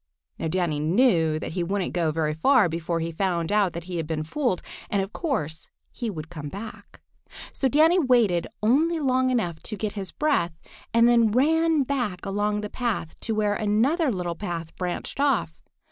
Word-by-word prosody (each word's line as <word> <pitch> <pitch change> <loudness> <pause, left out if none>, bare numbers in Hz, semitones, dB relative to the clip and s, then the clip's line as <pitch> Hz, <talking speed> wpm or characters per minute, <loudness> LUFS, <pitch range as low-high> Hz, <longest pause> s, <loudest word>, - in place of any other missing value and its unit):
Now - - -1
Danny 165 -3 0
knew 165 - +3
that - - -5
he 175 +1 -2
wouldn't 195 +2 -2
go 170 -3 +1
very 155 -1 0
far 220 - +4
before 165 0 -2
he 165 +1 -2
found 170 0 -1
out 205 -4 +2
that 170 - -5
he 175 0 -5
had 160 -2 -3
been 155 -1 -2
fooled, 240 - -1 0.3
and 200 - +1
of 195 +2 -3
course 160 - -3 0.2
he 235 -2 -4
would 160 -5 -7
come 150 -4 -6
back. 210 +6 -9 0.5
So 270 - +1
Danny 315 +7 +4
waited 235 - +3 0.2
only 315 +9 +3
long 260 -2 +2
enough 180 -10 -1
to 215 - -6
get 210 +1 -3
his 195 -3 -5
breath 175 - 0 0.3
and 230 +1 +5
then 235 -2 +5
ran 320 +5 +3
back 245 -10 -2
along 205 +1 0
the 210 - -4
path 230 -10 -2
to 225 - -2
where 210 -1 +1
another 245 - +2
little 180 -4 -2
path 170 -3 -5
branched 180 +7 -4
off. 275 - +1
205 Hz, 185 wpm, -25 LUFS, 170-250 Hz, 0.5 s, and